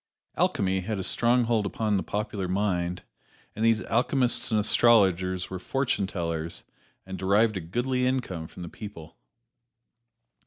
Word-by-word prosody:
Alchemy 95 -1 +1
had 105 +3 -3
a 95 - -3
strong 120 +6 +2
hold 115 -2 +1
upon 105 0 -1
the 95 - +1
popular 105 -2 -3
mind, 90 -2 -1 0.5
and 110 - -3
these 115 -1 +3
alchemists 125 +1 +1
and 110 - +2
astrologers 95 -5 +3
were 95 - -4
fortune 125 -2 -1
tellers 85 -3 -4 0.4
and 95 0 -7
derived 105 +3 +3
a 95 - -3
goodly 125 +9 -1
income 95 -11 -2
from 90 - -10
the - - -6
people. 85 -4 -10
100 Hz, 145 wpm, -27 LUFS, 90-115 Hz, 0.5 s, these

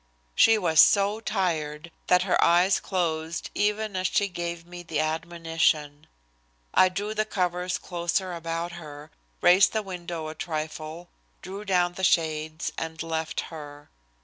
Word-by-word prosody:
She 225 - +6
was 165 -6 +2
so 205 0 +5
tired 170 -7 -2 0.2
that 180 0 +4
her 190 - +2
eyes 180 +3 +4
closed 165 -3 -2
even 210 0 0
as 185 0 +1
she 205 0 +1
gave 170 -2 -5
me 175 0 -9
the 165 -3 -3
admonition. 160 -2 -1 0.7
I 185 - +6
drew 205 +3 -3
the 215 0 +1
covers 180 -2 -1
closer 175 +1 -2
about 165 0 -3
her, 150 -2 -10 0.3
raised 180 +3 +6
the 220 -1 0
window 175 -4 -6
a - - -6
trifle, 155 +1 -5 0.3
drew 195 +3 -7
down 180 -3 +2
the 190 - -7
shades, 155 -2 +1
and 160 0 -5
left 160 -1 -2
her. 145 -2 -10
170 Hz, 145 wpm, -26 LUFS, 160-185 Hz, 0.7 s, She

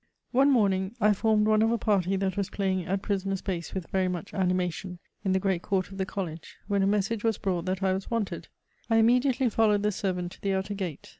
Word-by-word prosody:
One 270 +3 +4
morning 200 -5 +2
I 210 -1 +4
formed 215 +1 +2
one 215 0 +4
of 225 +1 +3
a 235 - +2
party 195 -4 +1
that 190 -1 -1
was 200 -1 -1
playing 190 -3 -1
at 195 +1 -1
prisoners 195 -1 -2
base 175 -3 -4
with 185 -3 -5
very 190 -1 +1
much 180 +2 -4
animation 180 -1 -1 0.3
in 190 - +1
the 190 - +3
great 190 -3 0
court 190 -1 -1
of 195 - -9
the 190 - -1
College, 165 -5 -6
when 200 -1 +1
a 195 - +3
message 205 +2 0
was 225 -2 +1
brought 180 -3 -2
that 190 +1 -2
I 190 -1 +3
was 190 +1 -4
wanted. 230 -4 -2 0.4
I 225 - +4
immediately 250 +3 +3
followed 210 -2 +2
the 210 - +2
servant 180 -3 -2
to - - -14
the 195 -1 0
outer 190 +2 -2
gate. 185 -7 -5
195 Hz, 230 wpm, -28 LUFS, 185-210 Hz, 0.4 s, One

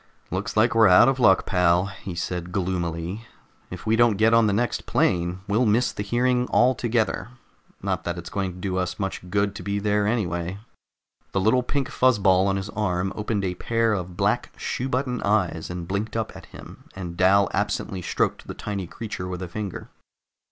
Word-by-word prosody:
"Looks 95 +4 -3
like 110 +3 +4
we're 115 -1 +6
out 90 -1 +7
of 135 0 +1
luck, 95 -6 +5
pal," 90 -1 +3
he 100 -2 -7
said 90 0 -4
gloomily. 90 +2 -3 0.4
"If 90 - -8
we 110 +1 +3
don't 115 -3 +4
get 110 +2 +4
on 115 -1 +5
the - - +2
next 115 +3 -1
plane, 90 +1 +1
we'll 110 +4 +2
miss 115 +4 +2
the - - -5
hearing 125 +4 +1
altogether. 120 -4 +1 0.6
Not 95 -2 -1
that 85 0 -2
it's 85 -1 -8
going 95 -2 -2
to - - -12
do 95 0 -3
us 90 -1 -2
much 95 -2 -4
good 100 +1 +1
to 105 - -8
be 100 0 -2
there 105 0 +1
anyway." 90 -5 -1 0.8
The 95 - +1
little 110 +6 +3
pink 135 +1 -2
fuzz 130 -3 +3
ball 95 -1 +4
on 95 - +1
his 95 +1 -4
arm 95 -3 -1
opened 105 -1 -2
a 90 - -1
pair 115 +4 0
of 90 -3 -4
black - - +1
shoe 130 +2 -3
button 125 -1 -1
eyes 95 -6 0
and 90 -1 -5
blinked 105 +4 -2
up 110 - -3
at - - -11
him, - - -13
and 90 -3 -6
Dal 95 +2 +4
absently 95 -1 -2
stroked - - -1
the - - -6
tiny 100 -4 -4
creature 100 -2 -6
with 90 0 -5
a - - -4
finger. 100 +1 -6
100 Hz, 195 wpm, -24 LUFS, 90-110 Hz, 0.8 s, out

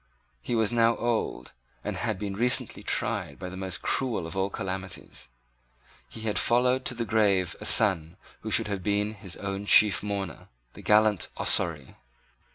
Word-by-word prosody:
He 120 - -2
was 110 -1 +1
now 115 -1 +3
old, 115 - -2 0.3
and - - -3
had - - -2
been 100 0 -4
recently 120 +5 +1
tried - - -1
by 90 - -6
the 95 - -9
most 95 -1 -5
cruel 125 -10 0
of 80 - -7
all 95 +1 0
calamities. 95 -8 -6 0.8
He 110 - -10
had 110 -1 -1
followed 125 +2 +2
to 125 - -2
the 115 0 -3
grave 100 -5 +1
a - - -1
son 90 -5 +2 0.2
who - - -6
should - - +3
have 100 -2 -3
been 105 +2 0
his 100 -4 -9
own 100 0 -5
chief 105 -4 +6
mourner, 100 -5 -5 0.3
the - - -12
gallant 105 -2 +3
Ossory. 75 -6 +1
100 Hz, 165 wpm, -27 LUFS, 95-110 Hz, 0.8 s, chief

